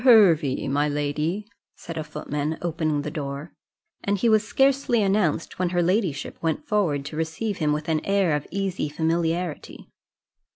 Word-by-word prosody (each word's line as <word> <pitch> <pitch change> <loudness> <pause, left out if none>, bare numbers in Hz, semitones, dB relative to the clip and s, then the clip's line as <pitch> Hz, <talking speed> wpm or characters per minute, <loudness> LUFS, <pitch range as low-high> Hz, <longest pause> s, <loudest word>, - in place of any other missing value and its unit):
Hervey, 170 - +5
my 145 +2 +1
lady," 150 +7 -1 0.3
said 165 - -8
a 155 - -2
footman, 150 0 -3
opening 155 -3 0
the 150 - -4
door; 145 0 -5 0.5
and 200 0 +1
he 230 +4 +2
was 215 -1 +4
scarcely 270 -1 +2
announced, 190 -6 0
when 180 -1 +1
her 175 0 +1
ladyship 180 -5 0
went 170 - -1
forward 175 - +1
to 150 - -6
receive 160 +7 -2
him 150 -2 +2
with 150 +1 -2
an 160 -1 0
air 195 -5 +2
of 150 - -4
easy 190 -5 -2
familiarity. 165 +1 -2
165 Hz, 160 wpm, -25 LUFS, 150-200 Hz, 0.5 s, Hervey